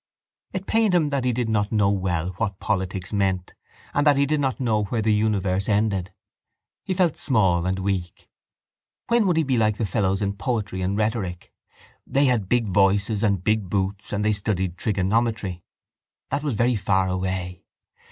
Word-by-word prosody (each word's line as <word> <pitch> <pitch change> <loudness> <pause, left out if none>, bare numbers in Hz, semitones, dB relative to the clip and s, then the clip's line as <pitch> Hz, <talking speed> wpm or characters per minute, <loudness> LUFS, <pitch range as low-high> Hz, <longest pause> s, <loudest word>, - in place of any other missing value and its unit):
It 190 0 -4
pained 220 -4 +2
him 160 -4 +3
that 140 -3 -1
he 125 - +2
did 120 0 -1
not 105 -2 0
know 105 -3 +3
well 90 -3 -1
what 100 -3 -2
politics 95 -2 -2
meant 95 -3 0 0.4
and 145 - +2
that 145 -2 +5
he 140 - +3
did 150 +1 0
not 135 -2 -1
know 110 -5 +1
where 115 +3 -2
the 110 0 +3
universe 100 -3 0
ended. 100 -3 +1 0.7
He 185 - -2
felt 175 -4 +2
small 95 - +2
and 95 +1 0
weak. 95 -2 -3 0.8
When 235 -3 +3
would 175 -3 +2
he 160 - +3
be 130 -3 0
like 110 -1 +2
the 115 - -1
fellows 100 -1 0
in 100 0 -1
poetry 105 -6 -2
and 95 +2 -1
rhetoric? 105 -5 -2 0.5
They 140 +1 +2
had 115 -7 +1
big 120 -2 +2
voices 100 +2 +2
and 100 -5 +1
big 105 -2 0
boots 100 +1 -2
and 105 0 -1
they 110 - +3
studied 95 -3 -2
trigonometry. 100 -2 -1 0.7
That - - 0
was 145 -6 -1
very 120 +3 +2
far 95 -2 +1
away. 90 -1 -3
105 Hz, 180 wpm, -24 LUFS, 95-120 Hz, 0.8 s, that